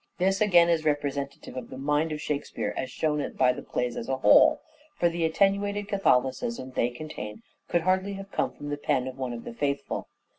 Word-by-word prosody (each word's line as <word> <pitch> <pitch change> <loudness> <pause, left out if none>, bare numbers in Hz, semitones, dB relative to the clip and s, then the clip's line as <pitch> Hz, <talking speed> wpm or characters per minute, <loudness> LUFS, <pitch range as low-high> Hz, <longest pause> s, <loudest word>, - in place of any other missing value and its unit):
This 190 +2 +1
again 175 -5 +6
is 165 -2 +2
representative 140 -3 -2
of 130 - -6
the - - -8
mind 150 +3 +1
of 150 - -3
Shakespeare 150 -1 -3
as 130 - -3
shown 150 +2 -1
by 125 -1 +3
the - - -7
plays 125 -1 -2
as 115 - -5
a 135 - 0
whole: 310 - +6 0.4
for 175 - +3
the 170 0 -2
attenuated 200 +4 +1
Catholicism 165 - +1
they 120 -1 +1
contain 120 -6 -7 0.2
could 175 - +1
hardly 185 +3 +1
have 195 0 -8
come - - 0
from 145 - -8
the 145 - -2
pen 140 -3 0
of 130 0 -7
one 130 -2 -2
of 115 -1 -6
the - - -7
faithful. 140 +2 -2
150 Hz, 200 wpm, -27 LUFS, 130-185 Hz, 0.4 s, again